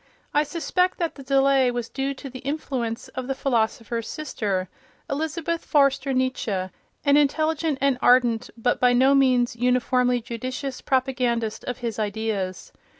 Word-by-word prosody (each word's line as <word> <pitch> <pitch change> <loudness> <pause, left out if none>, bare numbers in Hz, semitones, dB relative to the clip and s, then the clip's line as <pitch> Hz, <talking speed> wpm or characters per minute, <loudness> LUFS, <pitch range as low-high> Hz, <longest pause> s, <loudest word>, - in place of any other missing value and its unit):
I 295 - +4
suspect 360 +4 0
that 335 -2 -1
the 275 - -11
delay 270 -1 +3
was 240 -1 -3
due 275 +2 -3
to 275 - -9
the 255 -1 -8
influence 260 -5 -3
of 255 -1 -6
the 270 - -1
philosopher's 230 -3 -1
sister, 205 -11 -2 0.4
Elisabeth 320 +3 -3
Förster 275 -2 +3
Nietzsche, 225 -7 -1 0.4
an 285 0 +5
intelligent 310 +1 +1
and 275 -2 +2
ardent 245 -2 +4
but 245 +2 0
by 250 -1 +4
no 260 +3 +5
means 255 -3 +3
uniformly 250 0 +2
judicious 255 +3 -5
propagandist 250 -4 0
of 250 - -3
his 225 -2 -3
ideas. 205 -3 -3
255 Hz, 145 wpm, -24 LUFS, 235-275 Hz, 0.4 s, an